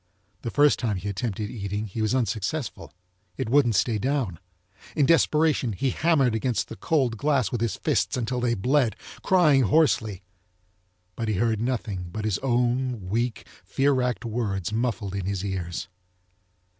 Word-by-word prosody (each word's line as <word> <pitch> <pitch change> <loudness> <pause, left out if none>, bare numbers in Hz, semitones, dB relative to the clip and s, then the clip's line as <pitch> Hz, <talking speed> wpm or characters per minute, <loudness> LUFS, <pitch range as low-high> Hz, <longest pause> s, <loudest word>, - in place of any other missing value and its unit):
The 115 - -3
first 145 +3 +4
time 110 -5 -1
he 95 - -6
attempted 105 +1 -3
eating 100 -1 -3
he 110 +2 -5
was 110 +3 +1
unsuccessful, 120 +3 -2 0.5
it - - -2
wouldn't 125 -4 +4
stay 110 -1 +1
down. 130 - -1 0.6
In 145 - +3
desperation 155 -5 +3
he 130 +6 0
hammered 145 -7 +2
against 115 +1 -1
the - - -7
cold 130 -4 0
glass 135 -6 +1
with 120 - -2
his 115 -2 0
fists - - 0
until 125 +1 -2
they 120 -1 +1
bled, 125 +1 +2 0.3
crying 155 -7 +4
hoarsely, 110 - +2 0.9
but 115 - -3
he 110 - 0
heard 110 +2 +1
nothing 110 -7 -3
but 110 +3 -4
his 105 -4 0
own 125 -4 0
weak, 115 +2 -1 0.2
fear 140 +1 +1
wracked 125 -2 -1
words 105 -4 -2
muffled 110 -4 -1
in 100 -2 -3
his 100 -1 -2
ears. 90 -2 -4
115 Hz, 155 wpm, -25 LUFS, 105-130 Hz, 0.9 s, first